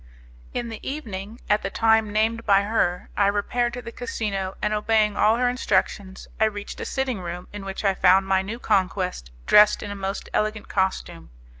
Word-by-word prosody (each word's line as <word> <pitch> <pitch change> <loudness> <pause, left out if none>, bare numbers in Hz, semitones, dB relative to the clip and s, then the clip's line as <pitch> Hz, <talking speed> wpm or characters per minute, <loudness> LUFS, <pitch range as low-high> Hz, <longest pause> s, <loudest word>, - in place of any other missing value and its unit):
In 240 -1 -3
the 225 - -7
evening, 225 -6 -6
at 210 0 +2
the 195 - -3
time 220 0 +2
named 225 +2 +1
by 200 -2 +4
her, 190 -4 0
I 200 - +3
repaired 240 +4 0
to 245 0 -6
the 230 - -7
casino, 205 -6 -3
and 210 - 0
obeying 210 -1 +2
all 220 +2 +3
her 250 0 +2
instructions 195 -5 -1
I 220 - +5
reached 205 -1 -5
a - - -4
sitting 265 -5 -2
room 175 0 -6
in 205 -1 -7
which 195 +2 -5
I 195 - +4
found 190 +1 +4
my 190 0 +2
new 210 +4 -5
conquest 185 - -1 0.2
dressed 210 0 +6
in 205 - -5
a - - -5
most 195 0 -4
elegant 215 0 -1
costume. 190 - -2
205 Hz, 190 wpm, -24 LUFS, 195-225 Hz, 0.2 s, dressed